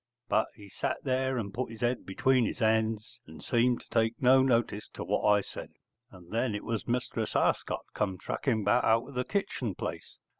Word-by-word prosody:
But 110 - +3
he 105 -2 -13
sat 100 - -2
there 130 -1 0
and 100 -4 -3
put 130 0 -2
his 110 -1 -10
head 120 +1 0
between 130 +6 +3
his - - -2
hands 110 -2 0
and 80 0 -12
seemed 120 0 +2
to - - -19
take 115 0 +1
no 130 0 +6
notice 115 -5 +1
to - - -4
what - - 0
I 105 -1 +5
said. - - -9 0.4
And 90 -2 -15
then 115 0 0
it 105 - -4
was 115 -2 -3
Mistress 125 +1 -1
Arscott - - +1
come 95 -3 -1
tracking 110 - -1
back 120 +5 +3
out 115 +1 +3
of - - -10
the 125 0 0
kitchen 130 - -2
place. - - -6
115 Hz, 200 wpm, -30 LUFS, 105-125 Hz, 0.4 s, no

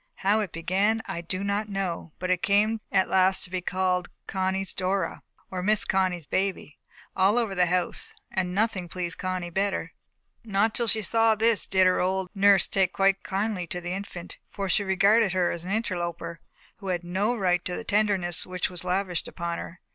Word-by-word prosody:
How 205 +3 +4
it 205 -5 -2
began, 195 +7 +1
I 170 - -4
do 185 +3 -4
not 200 +1 -1
know, 190 -5 -3
but 185 0 -2
it 180 -1 +1
came 215 +2 +2
at 190 - +3
last 190 0 +3
to 180 - -8
be 185 -1 -2
called 180 0 0 0.2
Connie's 190 0 -1
Dora, 185 -1 -1 0.3
or 185 -1 -3
Miss 210 +3 +2
Connie's 185 -4 0
baby, 190 -4 -2 0.4
all 195 +4 +4
over 225 -5 0
the 180 -2 +3
house, 180 0 +3 0.2
and 180 -1 -1
nothing 200 -4 0
pleased 175 -2 -4
Connie 185 -2 -3
better. 195 +2 -1 0.5
Not 215 0 +1
till 235 - -1
she 220 -1 +2
saw 225 +2 +3
this 225 0 +2
did 190 -1 +4
her 185 0 +3
old 185 0 -1
nurse 200 -2 +5
take 190 -2 +1
quite 195 0 +2
kindly 195 -2 -2
to 180 - -3
the 175 0 -4
infant; 190 -2 -7
for 200 -1 -4
she 195 +3 +2
regarded 200 +2 +3
her 180 -2 +2
as 170 0 -6
an 185 - -4
interloper, 175 -6 -3 0.4
who 195 - -9
had 180 -2 -1
no 195 +7 0
right 180 -4 +1
to 180 - -2
the - - -5
tenderness 200 -5 +1
which 180 0 -3
was 180 -1 -5
lavished 185 -1 -1
upon 170 0 -4
her. 170 - -9
190 Hz, 195 wpm, -26 LUFS, 180-200 Hz, 0.5 s, nurse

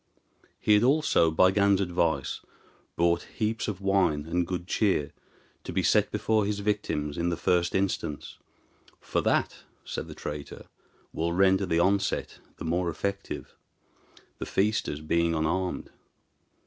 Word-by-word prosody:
He 105 - +3
had 105 - +5
also, 135 - +3
by 95 +4 +4
Gan's 100 -1 +3
advice, 85 -6 0 0.6
brought 85 0 +2 0.2
heaps 110 0 -1
of 100 -3 -4
wine 95 -7 +2
and 85 +1 -1
good 90 -1 -3
cheer 95 -7 +1 0.5
to - - -6
be - - 0
set - - +3
before 110 -1 +1
his 100 -1 -2
victims 85 -8 -2
in 85 +1 +1
the 85 - -2
first 90 -1 +1
instance; 95 -6 -2 0.6
"for - - -1
that," - - +1 0.3
said - - -5
the - - -9
traitor, 75 -1 -7 0.5
"will 85 +1 -1
render 95 +1 +3
the 80 - +1
onset 95 +3 +1 0.2
the - - -7
more 85 +2 0
effective, 100 +5 -4 0.9
the - - -4
feasters 100 -7 0
being 85 +1 +1
unarmed. 90 +4 -1
90 Hz, 140 wpm, -27 LUFS, 85-100 Hz, 0.9 s, had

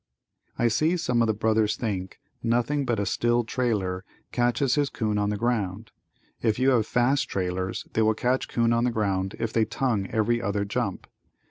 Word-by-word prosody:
I 120 - +3
see 155 +10 +2
some 125 -7 +1
of 115 - +3
the 110 - +2
brothers 110 0 +2
think 95 -5 -4 0.2
nothing 120 +5 +1
but 120 -4 0
a 100 - 0
still 120 +4 +1
trailer 105 -7 -1 0.3
catches 120 +2 +1
his 145 -1 +2
'coon 105 -4 -1
on 105 0 +1
the 105 - -1
ground. 110 -3 -2 0.5
If 110 -2 +1
you 130 +2 +3
have 115 -4 +2
fast 130 +3 +2
trailers 95 0 -2
they 110 - +2
will 110 0 +3
catch 125 +3 0
'coon 115 -1 +2
on 115 0 +2
the - - +3
ground 100 -2 -1
if 115 -1 -3
they 115 - +3
tongue 110 -5 -1
every 115 +2 +1
other 100 -2 -1
jump. 100 -1 -2
115 Hz, 190 wpm, -26 LUFS, 105-120 Hz, 0.5 s, I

